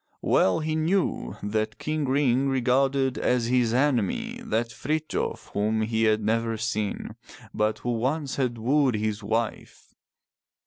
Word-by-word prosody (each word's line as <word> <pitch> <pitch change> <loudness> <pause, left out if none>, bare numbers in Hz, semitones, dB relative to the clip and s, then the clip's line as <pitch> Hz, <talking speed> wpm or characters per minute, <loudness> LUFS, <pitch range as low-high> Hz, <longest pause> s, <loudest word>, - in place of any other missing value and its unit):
Well 95 - +3
he 155 0 -1
knew 170 +4 0
that 110 +1 -1
King 155 -1 -2
Ring 135 0 +2
regarded 135 +1 +1
as 125 -2 +1
his 120 -1 +2
enemy 125 -5 0
that 115 +2 -1
Frithjof 155 +7 -3
whom 110 +2 +1
he 110 0 +1
had 110 0 +2
never 115 +1 0
seen, 110 -2 -3 0.4
but 105 0 0
who 120 - -3
once 135 +4 -1
had 125 -3 0
wooed 130 +2 +2
his 105 0 -2
wife. 110 +2 -3
120 Hz, 135 wpm, -26 LUFS, 110-135 Hz, 0.4 s, Well